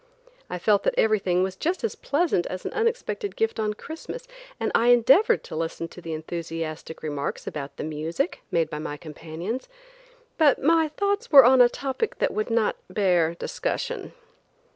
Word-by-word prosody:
I -, -, -3 dB
felt 200 Hz, +3 st, +3 dB
that -, -, 0 dB
everything 195 Hz, -5 st, +2 dB
was 190 Hz, 0 st, -2 dB
just 345 Hz, -, -2 dB
as 455 Hz, -, 0 dB
pleasant 290 Hz, -, 0 dB
as 185 Hz, 0 st, -6 dB
an -, -, -3 dB
unexpected 460 Hz, -1 st, -1 dB
gift 445 Hz, -, 0 dB
on 210 Hz, -1 st, -1 dB
Christmas, 325 Hz, -, -8 dB, 0.3 s
and -, -, -1 dB
I 235 Hz, -, +3 dB
endeavored 270 Hz, -, +5 dB
to -, -, -8 dB
listen 165 Hz, +1 st, -3 dB
to 180 Hz, -, -12 dB
the 165 Hz, -1 st, -5 dB
enthusiastic 160 Hz, 0 st, -6 dB
remarks 145 Hz, -2 st, -3 dB
about 145 Hz, -2 st, -6 dB
the -, -, -4 dB
music 155 Hz, -, -3 dB
made 165 Hz, -2 st, +1 dB
by 150 Hz, -, -4 dB
my 150 Hz, -1 st, -5 dB
companions, 165 Hz, -, -6 dB, 0.7 s
but 295 Hz, -4 st, +5 dB
my 320 Hz, +2 st, +3 dB
thoughts 405 Hz, +8 st, -2 dB
were 275 Hz, -4 st, +10 dB
on 255 Hz, +1 st, +7 dB
a 240 Hz, -, +7 dB
topic 275 Hz, -, -3 dB
that -, -, 0 dB
would 215 Hz, +2 st, -2 dB
not 230 Hz, -2 st, +1 dB
bear 175 Hz, -5 st, +2 dB
discussion. -, -, -3 dB
210 Hz, 170 wpm, -25 LUFS, -, 0.7 s, were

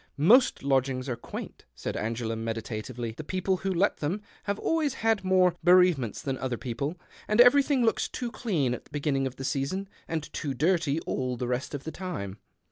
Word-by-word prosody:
" -, -, -43 dB, 0.2 s
Most 255 Hz, -, +4 dB
lodgings 135 Hz, -1 st, +1 dB
are 125 Hz, -, -1 dB
quaint," 115 Hz, -, -8 dB
said -, -, -4 dB
Angela, 115 Hz, +1 st, -2 dB
meditatively. 115 Hz, +1 st, -4 dB
" 110 Hz, -, -17 dB
The 155 Hz, -, -5 dB
people 185 Hz, +3 st, 0 dB
who 195 Hz, +1 st, -2 dB
let 190 Hz, +3 st, +2 dB
them 180 Hz, +8 st, -2 dB, 0.2 s
have 200 Hz, 0 st, -1 dB
always 310 Hz, -2 st, 0 dB
had 220 Hz, -4 st, +3 dB
more 185 Hz, -1 st, +4 dB
bereavements 175 Hz, -, +4 dB
than 135 Hz, -2 st, -2 dB
other 125 Hz, -2 st, -2 dB
people, 140 Hz, +8 st, -3 dB, 0.3 s
and 210 Hz, +2 st, +1 dB
everything 265 Hz, +1 st, +6 dB
looks 225 Hz, -, +1 dB
too 245 Hz, -2 st, -4 dB
clean 165 Hz, -, 0 dB
at -, -, -6 dB
the -, -, -22 dB
beginning 140 Hz, -2 st, 0 dB
of 130 Hz, -, -7 dB
the 135 Hz, -, -7 dB
season 145 Hz, +10 st, -1 dB, 0.2 s
and 160 Hz, -2 st, -2 dB
too 140 Hz, -3 st, -3 dB
dirty 160 Hz, 0 st, +2 dB
all 125 Hz, -5 st, -2 dB
the 125 Hz, -, -2 dB
rest 125 Hz, +3 st, -2 dB
of 140 Hz, -, -6 dB
the 160 Hz, -, -5 dB
time. 110 Hz, -, -5 dB
145 Hz, 200 wpm, -28 LUFS, 125-190 Hz, 0.3 s, everything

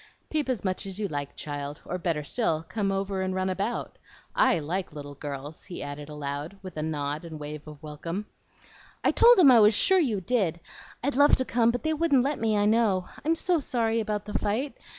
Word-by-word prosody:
"Peep 300 Hz, -3 st, 0 dB
as 250 Hz, -4 st, -1 dB
much 185 Hz, 0 st, -1 dB
as 195 Hz, +1 st, -6 dB
you 210 Hz, -, 0 dB
like, 145 Hz, -4 st, -5 dB
child; 145 Hz, 0 st, -5 dB
or, 180 Hz, -, -4 dB
better 165 Hz, -3 st, -1 dB
still, 165 Hz, -, -1 dB
come 200 Hz, -1 st, -1 dB
over 195 Hz, 0 st, -1 dB
and 185 Hz, 0 st, -1 dB
run 190 Hz, 0 st, 0 dB
about. 200 Hz, +6 st, -3 dB, 0.4 s
I -, -, +4 dB
like 170 Hz, +3 st, -3 dB
little 145 Hz, -1 st, -8 dB
girls," 145 Hz, +1 st, -7 dB
he 180 Hz, -, -6 dB
added 145 Hz, +1 st, -7 dB
aloud, 150 Hz, +4 st, -5 dB
with 185 Hz, -, -8 dB
a 155 Hz, -, -3 dB
nod 150 Hz, -1 st, -2 dB
and 165 Hz, -1 st, -8 dB
a -, -, -6 dB
wave 150 Hz, 0 st, -7 dB
of 150 Hz, 0 st, -11 dB
welcome. 165 Hz, +6 st, -5 dB, 0.8 s
"I -, -, +4 dB
told 480 Hz, +1 st, +7 dB
'em 310 Hz, -8 st, +8 dB
I 240 Hz, -, +8 dB
was 210 Hz, 0 st, +6 dB
sure 380 Hz, -, +4 dB
you 240 Hz, -, +1 dB
did! 190 Hz, -5 st, 0 dB, 0.4 s
I'd 280 Hz, +1 st, 0 dB
love 285 Hz, +2 st, +6 dB
to 260 Hz, -, 0 dB
come, 235 Hz, -2 st, +2 dB
but 245 Hz, +1 st, -1 dB
they 315 Hz, 0 st, +1 dB
wouldn't 300 Hz, -5 st, +3 dB
let 285 Hz, +2 st, -1 dB
me, 220 Hz, -1 st, +1 dB
I 205 Hz, -, +3 dB
know. 210 Hz, -4 st, +2 dB
I'm 320 Hz, +2 st, +2 dB
so 345 Hz, +1 st, +1 dB
sorry 230 Hz, -5 st, 0 dB
about 210 Hz, -2 st, -2 dB
the 210 Hz, -, -7 dB
fight. 230 Hz, +9 st, -1 dB
195 Hz, 220 wpm, -27 LUFS, 155-235 Hz, 0.8 s, em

